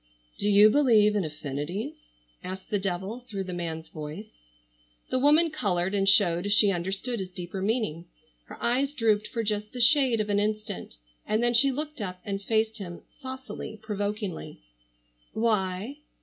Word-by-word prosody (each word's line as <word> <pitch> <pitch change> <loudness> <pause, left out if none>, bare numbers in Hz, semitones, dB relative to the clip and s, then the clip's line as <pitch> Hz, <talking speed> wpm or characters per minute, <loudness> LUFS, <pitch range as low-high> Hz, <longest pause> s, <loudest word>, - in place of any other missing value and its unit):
"Do 205 - +1
you 205 +1 +7
believe 220 -7 +4
in 205 - +1
affinities?" 150 - -5 0.3
asked 185 +3 -7
the 205 - +1
devil, 190 +4 -3
through 220 -6 -5
the 185 -1 -6
man's 165 -2 -4
voice. 155 +8 -8 0.8
The 255 - +2
woman 305 +4 +5
colored 190 - 0
and 195 -1 +3
showed 195 -1 +4
she 205 -1 +6
understood 195 +7 -2
his 190 -1 -4
deeper 180 +1 -6
meaning. 195 -6 -1 0.4
Her - - -11
eyes 270 +4 0
drooped 215 -4 +2
for 230 - -3
just 210 +1 -2
the 250 - -6
shade 255 -2 +5
of 210 -1 -1
an 205 - +2
instant, 210 - -3 0.3
and 215 +2 +1
then 240 0 +3
she 270 +4 +5
looked 300 -1 -5
up 180 -2 -5
and 195 -1 -3
faced 220 +1 0
him 175 -3 -8
saucily, 260 -4 -8
provokingly: 205 -2 -4 0.7
"Why?" 215 +2 0
210 Hz, 160 wpm, -27 LUFS, 185-235 Hz, 0.8 s, you